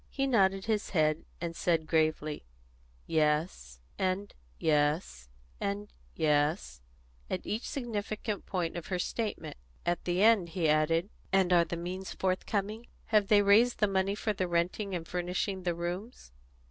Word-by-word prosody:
He 275 Hz, -, -1 dB
nodded 195 Hz, -7 st, +3 dB
his 215 Hz, -2 st, 0 dB
head, 155 Hz, -3 st, +1 dB
and 170 Hz, -1 st, -4 dB
said 165 Hz, -3 st, +1 dB
gravely, 155 Hz, -2 st, 0 dB, 0.6 s
"Yes," 150 Hz, -, 0 dB, 0.2 s
and 190 Hz, +2 st, -1 dB, 0.2 s
"Yes," 150 Hz, -, 0 dB, 0.3 s
and 205 Hz, +1 st, -3 dB, 0.2 s
"Yes," 145 Hz, -, +1 dB, 0.5 s
at -, -, -3 dB
each 220 Hz, +3 st, -3 dB
significant 215 Hz, -5 st, -4 dB
point 180 Hz, -3 st, -2 dB
of 170 Hz, -, -5 dB
her 185 Hz, -, -1 dB
statement. 215 Hz, -, -3 dB, 0.3 s
At 175 Hz, 0 st, -1 dB
the 180 Hz, +2 st, +1 dB
end 215 Hz, -6 st, +5 dB
he 165 Hz, -1 st, 0 dB
asked: 155 Hz, +2 st, +3 dB, 0.3 s
"And 190 Hz, -2 st, +3 dB
are 170 Hz, -1 st, +5 dB
the 170 Hz, +1 st, -4 dB
means 185 Hz, +3 st, -5 dB
forthcoming? 200 Hz, +4 st, -2 dB, 0.3 s
Have 210 Hz, -2 st, +5 dB
they 205 Hz, 0 st, +5 dB
raised 220 Hz, +5 st, +5 dB
the 210 Hz, -, +3 dB
money 195 Hz, 0 st, +1 dB
for 215 Hz, 0 st, -1 dB
renting 185 Hz, +2 st, -1 dB
and 165 Hz, -2 st, -5 dB
furnishing 180 Hz, +2 st, -2 dB
the 175 Hz, -2 st, -1 dB
rooms?" 175 Hz, -, -5 dB
180 Hz, 145 wpm, -30 LUFS, 165-205 Hz, 0.6 s, end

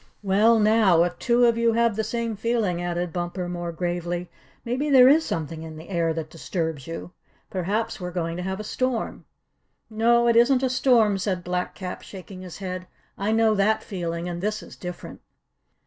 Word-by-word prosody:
"Well, 210 Hz, +4 st, +4 dB
now, 210 Hz, -5 st, +5 dB
if 175 Hz, -, -3 dB
two 240 Hz, -1 st, +3 dB
of 230 Hz, -1 st, +3 dB
you 230 Hz, -1 st, +3 dB
have 230 Hz, -2 st, +2 dB
the 220 Hz, -, -1 dB
same 230 Hz, +1 st, -2 dB
feeling," 215 Hz, -5 st, 0 dB
added 175 Hz, -1 st, -2 dB
Bumper 175 Hz, +1 st, -3 dB
more 175 Hz, -1 st, -4 dB
gravely, 175 Hz, +1 st, -3 dB, 0.3 s
"maybe 260 Hz, +5 st, -1 dB
there 255 Hz, -3 st, +8 dB
is 305 Hz, +4 st, +6 dB
something 160 Hz, -, -4 dB
in 160 Hz, -1 st, -8 dB
the 160 Hz, +4 st, -11 dB
air 170 Hz, -3 st, +1 dB
that 160 Hz, -1 st, -5 dB
disturbs 160 Hz, -4 st, -4 dB
you. 165 Hz, +1 st, -6 dB, 0.4 s
Perhaps 205 Hz, +4 st, -2 dB
we're 180 Hz, -, -3 dB
going 170 Hz, -2 st, -3 dB
to -, -, -3 dB
have 190 Hz, +2 st, -3 dB
a -, -, -4 dB
storm." 250 Hz, +2 st, -2 dB, 0.7 s
"No, 235 Hz, +2 st, +3 dB
it 235 Hz, -, +4 dB
isn't 250 Hz, +3 st, +5 dB
a 260 Hz, -, +1 dB
storm," 235 Hz, -6 st, +3 dB
said 185 Hz, -2 st, -2 dB
Black 180 Hz, 0 st, -2 dB
Cap, 185 Hz, -2 st, -6 dB
shaking 185 Hz, -1 st, -10 dB
his 180 Hz, -2 st, -9 dB
head. 185 Hz, -1 st, -5 dB, 0.3 s
"I 200 Hz, +2 st, -1 dB
know 225 Hz, 0 st, +4 dB
that 210 Hz, +2 st, +2 dB
feeling, 170 Hz, -3 st, -4 dB
and 175 Hz, -1 st, -4 dB
this 210 Hz, +1 st, -2 dB
is -, -, -12 dB
different." 180 Hz, -1 st, -8 dB
190 Hz, 190 wpm, -25 LUFS, 175-230 Hz, 0.7 s, there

